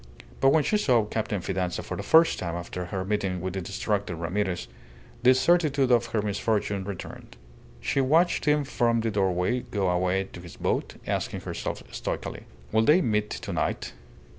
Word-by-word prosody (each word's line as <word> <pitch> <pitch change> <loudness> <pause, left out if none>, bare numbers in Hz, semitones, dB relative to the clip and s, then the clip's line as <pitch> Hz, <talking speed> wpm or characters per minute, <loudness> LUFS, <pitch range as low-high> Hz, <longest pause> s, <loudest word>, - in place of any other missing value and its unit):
But 135 - +5
when 150 +2 +4
she 210 - +1
saw 125 - +3
Captain 105 -2 -2
Fidanza 90 -1 -2
for - - -5
the - - -4
first 165 +1 +5
time 85 -2 -3
after 85 +1 -5
her 95 +1 -4
meeting 100 -3 -1
with 95 +1 -4
the 95 - -3
distracted 100 0 -2
Ramirez, 90 -3 -2 0.5
the 130 +1 +6
certitude 145 -3 +3
of 120 -1 +4
her 110 -2 -1
misfortune 100 -1 -1
returned. 95 -10 -8 0.4
She 135 - +1
watched 160 +7 +3
him 150 0 +3
from 120 -4 +1
the 115 0 -1
doorway 95 +3 +1
go 100 -6 -1
away 90 +2 +1
to 90 - -8
his 85 -1 -11
boat, - - -1
asking - - -2
herself - - -4
stoically, - - -5 0.2
"Will 110 - +4
they 150 +10 +5
meet 105 -3 0
to - - -5
night?" - - -2
105 Hz, 175 wpm, -27 LUFS, 95-125 Hz, 0.5 s, the